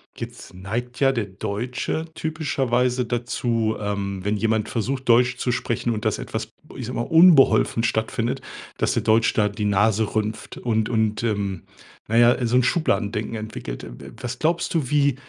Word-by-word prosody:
Jetzt -, -, -9 dB
neigt 115 Hz, +7 st, -5 dB
ja 135 Hz, -1 st, +4 dB
der 115 Hz, -5 st, -1 dB
Deutsche 120 Hz, +10 st, -3 dB
typischerweise 130 Hz, -6 st, 0 dB
dazu, 120 Hz, -2 st, -1 dB
ähm, 100 Hz, -2 st, -3 dB
wenn 105 Hz, +1 st, 0 dB
jemand 110 Hz, 0 st, 0 dB
versucht, 130 Hz, +3 st, -3 dB
Deutsch 125 Hz, +1 st, +4 dB
zu 125 Hz, -, -1 dB
sprechen 120 Hz, 0 st, -2 dB
und 110 Hz, 0 st, -3 dB
das 110 Hz, -, 0 dB
etwas, 110 Hz, 0 st, -5 dB, 0.3 s
ich 125 Hz, -, -5 dB
sage 125 Hz, +1 st, -4 dB
mal, -, -, +1 dB
unbeholfen 160 Hz, -8 st, +6 dB
stattfindet, 115 Hz, +2 st, -1 dB, 0.4 s
dass -, -, +1 dB
der -, -, 0 dB
Deutsch 110 Hz, +1 st, +3 dB
da 105 Hz, -2 st, +2 dB
die 105 Hz, +1 st, -4 dB
Nase 105 Hz, +1 st, +2 dB
rümpft 110 Hz, 0 st, -3 dB
und 110 Hz, -3 st, 0 dB
und, 110 Hz, -1 st, 0 dB
ähm, 100 Hz, -5 st, -2 dB, 0.4 s
na 115 Hz, -, -1 dB
ja, 120 Hz, +1 st, +5 dB
so 120 Hz, +2 st, +2 dB
'n 125 Hz, -, +5 dB
Schubladendenken 105 Hz, -, 0 dB
entwickelt. 110 Hz, -, -6 dB
Äh, -, -, -11 dB
w -, -, -11 dB
w -, -, -10 dB
was 125 Hz, 0 st, -4 dB
glaubst 170 Hz, +4 st, 0 dB
du, 150 Hz, -6 st, +1 dB
wie, 145 Hz, -3 st, +3 dB
115 Hz, 175 wpm, -23 LUFS, 105-125 Hz, 0.4 s, unbeholfen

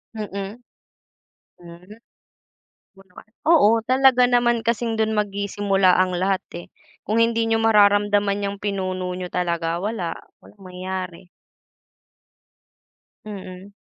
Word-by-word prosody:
Mm. 200 Hz, 0 st, -6 dB, 1.0 s
Hmm, 175 Hz, +3 st, -14 dB, 1.0 s
oo 195 Hz, -, -16 dB
naman. 180 Hz, +3 st, -16 dB, 0.2 s
Oo 315 Hz, -10 st, +5 dB, 0.2 s
talaga 255 Hz, 0 st, +4 dB
naman 240 Hz, -2 st, +1 dB
kasing 230 Hz, 0 st, -1 dB
'don 220 Hz, 0 st, 0 dB
magsisimula 200 Hz, -2 st, +1 dB
ang 185 Hz, -1 st, 0 dB
lahat, 190 Hz, +1 st, 0 dB, 0.2 s
eh. 175 Hz, -, -10 dB, 0.4 s
Kung 225 Hz, +2 st, +1 dB
hindi 230 Hz, 0 st, +1 dB
niyo 225 Hz, 0 st, +1 dB
mararamdaman 205 Hz, -2 st, +3 dB
niyang 200 Hz, 0 st, -3 dB
pinuno 185 Hz, -2 st, -3 dB
niyo 180 Hz, 0 st, -6 dB
talaga 170 Hz, -2 st, -2 dB
wala, 185 Hz, -3 st, -4 dB, 0.2 s
walang 205 Hz, -, -18 dB
mangyayari. 185 Hz, -1 st, -6 dB, 2.0 s
Mm. 195 Hz, -1 st, -9 dB
200 Hz, 110 wpm, -22 LUFS, 185-220 Hz, 2.0 s, Oo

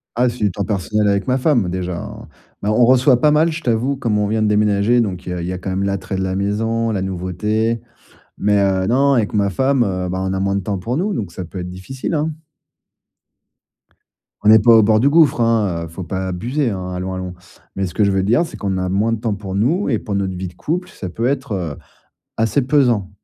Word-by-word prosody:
Ah, 125 Hz, +2 st, +3 dB
c'est 120 Hz, 0 st, -4 dB
du 105 Hz, -2 st, +1 dB
temps 100 Hz, +3 st, -3 dB
personnel 105 Hz, +1 st, 0 dB
avec 100 Hz, -1 st, +1 dB
ma 130 Hz, 0 st, +2 dB
femme, 125 Hz, -, +2 dB
déjà, 90 Hz, -1 st, -3 dB
hein. -, -, -8 dB, 0.3 s
Mais 100 Hz, -, -1 dB
on 120 Hz, +3 st, +4 dB
reçoit 130 Hz, 0 st, +4 dB
pas 150 Hz, -, +5 dB
mal, 155 Hz, +2 st, +4 dB
je 160 Hz, +1 st, -5 dB
t'avoue, 120 Hz, +4 st, 0 dB
comme 120 Hz, -5 st, -1 dB
on 105 Hz, -, +1 dB
vient 110 Hz, +1 st, 0 dB
de -, -, +2 dB
déménager, 105 Hz, +2 st, +3 dB
donc 95 Hz, -6 st, -2 dB
il -, -, -6 dB
y -, -, -2 dB
a 90 Hz, -, -4 dB
il 85 Hz, -, -4 dB
y 90 Hz, -, -2 dB
a -, -, -4 dB
quand 90 Hz, +1 st, -5 dB
même 95 Hz, +1 st, -1 dB
l'attrait 100 Hz, 0 st, -2 dB
de -, -, -2 dB
la 95 Hz, 0 st, -2 dB
maison, 115 Hz, +3 st, 0 dB
la 100 Hz, -3 st, -1 dB
nouveauté. 105 Hz, +5 st, -1 dB, 0.6 s
Mais, 105 Hz, 0 st, +2 dB
heu, 95 Hz, -1 st, +1 dB
non, 140 Hz, +3 st, +3 dB
avec 115 Hz, -6 st, +1 dB
ma 100 Hz, -2 st, +2 dB
femme, 130 Hz, +5 st, +2 dB
heu, 90 Hz, -3 st, -2 dB
ben, 95 Hz, +1 st, -2 dB
on -, -, -1 dB
a 95 Hz, -, -1 dB
moins 100 Hz, 0 st, 0 dB
de 100 Hz, -, 0 dB
temps 100 Hz, 0 st, -3 dB
pour 120 Hz, +8 st, -2 dB
nous, 200 Hz, +5 st, -1 dB
donc 100 Hz, -, -4 dB
ça 95 Hz, -, -6 dB
peut 90 Hz, +3 st, -8 dB
être 90 Hz, 0 st, -5 dB
difficile, 125 Hz, -, -5 dB
hein. 155 Hz, +1 st, 0 dB, 2.1 s
On 105 Hz, -, +5 dB
n'est 110 Hz, 0 st, +8 dB
pas 115 Hz, +3 st, +5 dB
au 110 Hz, -, +7 dB
bord 110 Hz, +1 st, +3 dB
du 130 Hz, -, +3 dB
gouffre, 155 Hz, -3 st, +4 dB
hein, 105 Hz, -7 st, +1 dB
heu, -, -, -8 dB
faut 85 Hz, +3 st, -7 dB
pas 95 Hz, +2 st, -3 dB
abuser, 120 Hz, +8 st, -1 dB
hein, 95 Hz, -2 st, -5 dB
allons, 90 Hz, +1 st, -4 dB
allons. 90 Hz, -1 st, -5 dB, 0.4 s
Mais 95 Hz, -, -1 dB
ce 90 Hz, -, -6 dB
que 105 Hz, -, +2 dB
je 100 Hz, -, +3 dB
veux 95 Hz, -1 st, +1 dB
dire, 120 Hz, -, +3 dB
c'est 170 Hz, -, -8 dB
qu'on 95 Hz, -2 st, -2 dB
a 90 Hz, 0 st, -2 dB
moins 105 Hz, +5 st, +1 dB
de 115 Hz, -, -2 dB
temps 110 Hz, -2 st, -1 dB
pour 95 Hz, -2 st, -7 dB
nous 135 Hz, -, +1 dB
et 115 Hz, -6 st, +1 dB
pour 105 Hz, -, -4 dB
notre 95 Hz, -1 st, -1 dB
vie 90 Hz, +1 st, -4 dB
de 90 Hz, -, -12 dB
couple, 175 Hz, -, -3 dB
ça 95 Hz, -, -7 dB
peut 115 Hz, +7 st, -2 dB
être, 135 Hz, -2 st, -2 dB
heu, 85 Hz, -6 st, -3 dB, 0.6 s
assez 115 Hz, +5 st, +1 dB
pesant. 125 Hz, -8 st, +2 dB
105 Hz, 255 wpm, -19 LUFS, 95-120 Hz, 2.1 s, n'est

